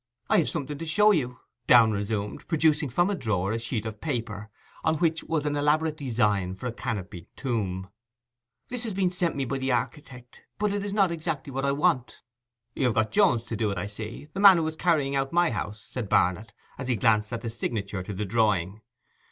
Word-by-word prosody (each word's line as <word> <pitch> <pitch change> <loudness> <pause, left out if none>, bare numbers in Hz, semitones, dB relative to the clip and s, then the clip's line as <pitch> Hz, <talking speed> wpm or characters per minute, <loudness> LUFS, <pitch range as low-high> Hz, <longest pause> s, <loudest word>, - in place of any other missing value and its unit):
'I - - +6
have 165 - +1
something 145 -3 -4
to 165 - -4
show 210 +6 +5
you,' 125 -9 -1 0.3
Downe 115 -2 +7
resumed, 105 0 -3
producing 155 -3 +2
from 175 +10 +2
a - - 0
drawer 105 - -1
a 115 - -1
sheet 115 -1 -3
of 110 -1 -6
paper 115 -8 -3 0.3
on 160 - +2
which 165 0 +1
was 155 -2 -1
an 145 0 0
elaborate 150 +2 +2
design 105 - 0
for 95 - -9
a 125 - -1
canopied 100 -6 -5
tomb. 100 -8 -2 0.8
'This 250 -1 -3
has 220 - -3
been 185 -2 +1
sent 180 -2 -1
me 135 -1 -1
by 135 +2 -2
the 130 0 -1
architect, 125 0 -4 0.2
but 210 0 0
it 205 -1 -2
is 205 - -3
not 195 -3 +3
exactly 150 -4 -4
what 135 +1 -1
I 140 - +2
want.' 140 -3 0 0.5
'You 135 - -1
have 120 - +1
got 110 0 +1
Jones 185 - +3
to 115 - -5
do 110 -1 0
it, 100 - -3
I 90 - -2
see, 110 +7 -7
the 195 - -4
man 195 -3 +9
who 160 -1 0
is 160 - -4
carrying 155 -5 +1
out 135 0 0
my 175 -2 +3
house,' 105 -1 -5
said 120 -6 -6
Barnet, 95 +5 +2 0.3
as 130 - -4
he 125 - +1
glanced 105 0 +2
at 115 -1 -3
the 115 -1 -4
signature 105 -4 -3
to 90 - -7
the 105 +3 -2
drawing. 105 -2 +1
125 Hz, 215 wpm, -27 LUFS, 105-160 Hz, 0.8 s, man